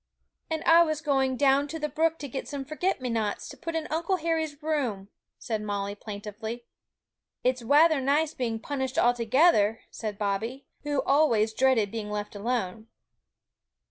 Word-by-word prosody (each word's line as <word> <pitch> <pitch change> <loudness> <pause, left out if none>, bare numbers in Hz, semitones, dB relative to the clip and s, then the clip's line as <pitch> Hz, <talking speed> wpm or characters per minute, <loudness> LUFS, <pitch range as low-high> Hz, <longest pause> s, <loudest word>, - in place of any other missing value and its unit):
'And 320 -1 -2
I 335 +1 +7
was 310 -3 +1
going 270 -4 +1
down 280 +1 +3
to 320 +3 -5
the 300 -1 -2
brook 320 +3 +1
to 285 - -6
get 265 +1 -5
some 280 -2 -5
forget 310 +2 -1
me 255 - -2
nots, 220 -3 -2
to - - -9
put 330 0 -5
in 320 -1 -1
Uncle 335 +4 0
Harry's 320 -3 -2
room,' 245 -11 -1 0.3
said 220 -3 -3
Molly 200 -1 -3
plaintively. 215 +3 -7 0.8
'It's 250 -1 +1
wather 295 +4 +5
nice 290 +4 +1
being 230 -3 -2
punished 265 0 -3
all 240 0 +5
together,' 230 -2 +3
said 215 -3 -5
Bobby, 220 +6 -2 0.2
who 290 -2 -1
always 235 -7 +3
dreaded 230 -5 +2
being 220 -2 -4
left 210 0 -4
alone. 220 -1 -2
260 Hz, 165 wpm, -27 LUFS, 220-300 Hz, 0.8 s, I